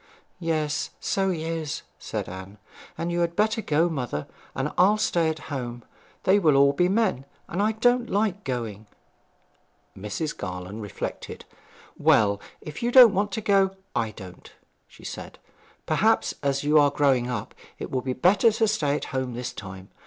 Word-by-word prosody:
'Yes, 155 Hz, -3 st, -1 dB
so 195 Hz, -1 st, 0 dB
he 165 Hz, -4 st, -2 dB
is,' 160 Hz, -2 st, -3 dB, 0.2 s
said -, -, -4 dB
Anne. 95 Hz, +3 st, -9 dB, 0.4 s
'And 170 Hz, +1 st, -2 dB
you 175 Hz, -, -1 dB
had 170 Hz, 0 st, 0 dB
better 220 Hz, +2 st, +1 dB
go, 160 Hz, -2 st, +2 dB
mother; 125 Hz, -, -3 dB, 0.3 s
and 135 Hz, +3 st, -1 dB
I'll 195 Hz, +4 st, +5 dB
stay 175 Hz, -7 st, +1 dB
at 160 Hz, -1 st, -6 dB
home. 120 Hz, -3 st, -5 dB, 0.4 s
They 195 Hz, +2 st, +4 dB
will 140 Hz, -5 st, +5 dB
be 175 Hz, +5 st, +2 dB
all -, -, 0 dB
men; 195 Hz, -, +1 dB, 0.2 s
and 180 Hz, -, -2 dB
I 215 Hz, +2 st, +2 dB
don't 245 Hz, +2 st, +2 dB
like 205 Hz, 0 st, 0 dB
going.' 115 Hz, -5 st, -4 dB, 1.1 s
Mrs. 105 Hz, +10 st, -4 dB
Garland 90 Hz, +4 st, -6 dB
reflected. 105 Hz, -2 st, -6 dB, 0.5 s
'Well, 100 Hz, -1 st, +4 dB, 0.2 s
if 155 Hz, 0 st, -8 dB
you 240 Hz, +1 st, 0 dB
don't 245 Hz, -4 st, +9 dB
want 200 Hz, +2 st, 0 dB
to 220 Hz, -, -2 dB
go, 195 Hz, -2 st, +3 dB, 0.2 s
I 115 Hz, -, 0 dB
don't,' 95 Hz, -4 st, -12 dB, 0.4 s
she -, -, -18 dB
said. -, -, -7 dB, 0.5 s
'Perhaps, -, -, +2 dB
as 140 Hz, 0 st, 0 dB
you 150 Hz, +1 st, +5 dB
are 145 Hz, -1 st, +5 dB
growing 135 Hz, -4 st, +2 dB
up, 120 Hz, -5 st, -4 dB, 0.2 s
it -, -, -7 dB
would 130 Hz, -1 st, -1 dB
be 130 Hz, -, -1 dB
better 190 Hz, -, +4 dB
to 225 Hz, 0 st, +2 dB
stay 150 Hz, -9 st, +1 dB
at -, -, -3 dB
home 130 Hz, -2 st, -2 dB
this 125 Hz, 0 st, -4 dB
time. 95 Hz, -2 st, -9 dB
150 Hz, 170 wpm, -25 LUFS, 120-195 Hz, 1.1 s, don't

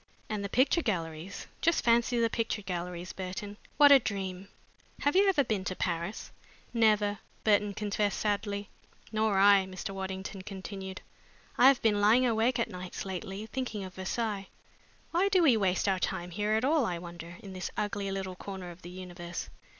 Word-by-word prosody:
And 210 Hz, -2 st, -2 dB
the 200 Hz, -, -3 dB
picture 265 Hz, -, +3 dB
galleries 170 Hz, -, -3 dB, 0.2 s
just 335 Hz, 0 st, +2 dB
fancy 235 Hz, +1 st, +3 dB
the 230 Hz, -, +4 dB
picture 225 Hz, -2 st, -2 dB
galleries, 180 Hz, -1 st, -4 dB
Burton! 200 Hz, +2 st, -6 dB, 0.2 s
What 290 Hz, -1 st, +8 dB
a 280 Hz, -, +10 dB
dream! 195 Hz, -4 st, -4 dB, 0.5 s
Have 290 Hz, +3 st, +2 dB
you 395 Hz, +1 st, +6 dB
ever 315 Hz, -7 st, +3 dB
been 215 Hz, -6 st, -1 dB
to 185 Hz, -, -2 dB
Paris?" 170 Hz, +3 st, -3 dB, 0.4 s
"Never," 210 Hz, -3 st, +3 dB, 0.2 s
Burton 205 Hz, -1 st, +3 dB
confessed 205 Hz, -1 st, 0 dB
sadly. 205 Hz, -1 st, -1 dB, 0.4 s
"Nor 215 Hz, -2 st, +1 dB
I," 195 Hz, -1 st, +6 dB
Mr. 185 Hz, +1 st, -6 dB
Waddington 190 Hz, 0 st, -5 dB
continued. 190 Hz, -1 st, -7 dB, 0.5 s
"I 255 Hz, -, +7 dB
have 270 Hz, -2 st, +5 dB
been 210 Hz, -2 st, +3 dB
lying 230 Hz, +5 st, +5 dB
awake 235 Hz, +1 st, +2 dB
at 235 Hz, -, +1 dB
nights 180 Hz, +1 st, -6 dB
lately, 190 Hz, +2 st, -5 dB
thinking 225 Hz, -4 st, -4 dB
of 185 Hz, -1 st, -8 dB
Versailles. 200 Hz, +1 st, -2 dB, 0.6 s
Why 365 Hz, +4 st, +3 dB
do 375 Hz, -3 st, +4 dB
we 270 Hz, -7 st, +6 dB
waste 190 Hz, -2 st, +1 dB
our 190 Hz, -1 st, +2 dB
time 175 Hz, 0 st, -2 dB
here 210 Hz, +3 st, 0 dB
at 220 Hz, +3 st, +2 dB
all, 300 Hz, 0 st, +3 dB
I 180 Hz, -6 st, -1 dB
wonder, 170 Hz, 0 st, -9 dB
in 195 Hz, -2 st, -8 dB
this 185 Hz, 0 st, -4 dB
ugly 205 Hz, -1 st, -1 dB
little 190 Hz, -1 st, -4 dB
corner 190 Hz, -2 st, -7 dB
of 175 Hz, +1 st, -14 dB
the 175 Hz, -, -9 dB
universe?" 175 Hz, -1 st, -7 dB
200 Hz, 175 wpm, -30 LUFS, 185-225 Hz, 0.6 s, a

